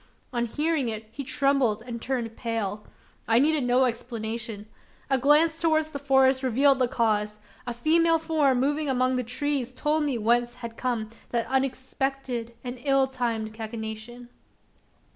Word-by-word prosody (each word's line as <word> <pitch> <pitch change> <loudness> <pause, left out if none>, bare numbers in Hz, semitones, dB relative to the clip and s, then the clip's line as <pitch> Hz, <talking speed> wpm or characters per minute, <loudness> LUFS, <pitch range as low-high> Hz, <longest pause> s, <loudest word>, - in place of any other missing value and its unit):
On 240 -1 0
hearing 295 0 0
it, 220 0 -5
he 280 +5 -6
trembled 265 -5 +1
and 235 -2 -6
turned 235 -4 -3
pale. 215 -3 -3 0.4
I 225 +1 +4
needed 295 +2 +3
no 250 +1 +3
explanation. 230 -2 -4 0.5
A 270 - +4
glance 310 +4 +4
towards 315 -1 +2
the 280 - -5
forest 265 -1 +3
revealed 265 +2 +3
the 255 - +3
cause. 210 -3 0 0.3
A 240 - -2
female 330 +6 +3
form 305 -5 +2
moving 290 +3 0
among 255 0 +2
the 250 - 0
trees 260 +1 -1
told 300 +4 0
me 280 -4 0
whence 240 +2 +1
had 235 -2 -8
come 230 -4 -2 0.2
that 235 -1 0
unexpected 265 -2 -2
and 250 0 -6
ill 275 -1 +3
timed 230 -4 -3
cachinnation. 220 +2 -7
250 Hz, 150 wpm, -26 LUFS, 230-275 Hz, 0.5 s, I